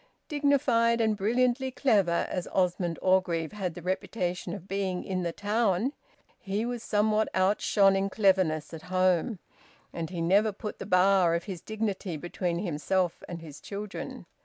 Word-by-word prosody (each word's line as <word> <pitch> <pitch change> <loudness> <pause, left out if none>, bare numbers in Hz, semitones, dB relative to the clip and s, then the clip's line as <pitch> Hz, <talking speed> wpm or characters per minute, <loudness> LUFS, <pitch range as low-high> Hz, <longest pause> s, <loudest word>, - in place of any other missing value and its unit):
Dignified 260 -6 +2
and 220 -2 +2
brilliantly 245 +5 +1
clever 205 -10 +2
as 180 - -3
Osmond 180 -2 0
Orgreave 180 -4 +2
had 190 -5 -4
the 175 - -9
reputation 185 0 -2
of 190 -2 -10
being 190 -2 -2
in 185 -1 -2
the 170 -1 -1
town, 210 - 0 0.5
he 200 +3 -2
was 240 -1 -3
somehow 215 0 +2
outshone 195 +1 +3
in 195 +1 0
cleverness 185 -7 +2
at 160 - -7
home, 185 +3 +2 0.6
and 165 -1 -4
he 175 -2 -5
never 200 +6 +3
put 210 +2 -7
the - - -6
bar 185 -2 +4
of 170 - -2
his 180 -3 -6
dignity 205 -6 -3
between 175 +2 -3
himself 175 0 -1
and 170 -1 -6
his 150 -3 -11
children. 205 +1 -6
190 Hz, 155 wpm, -28 LUFS, 175-215 Hz, 0.6 s, bar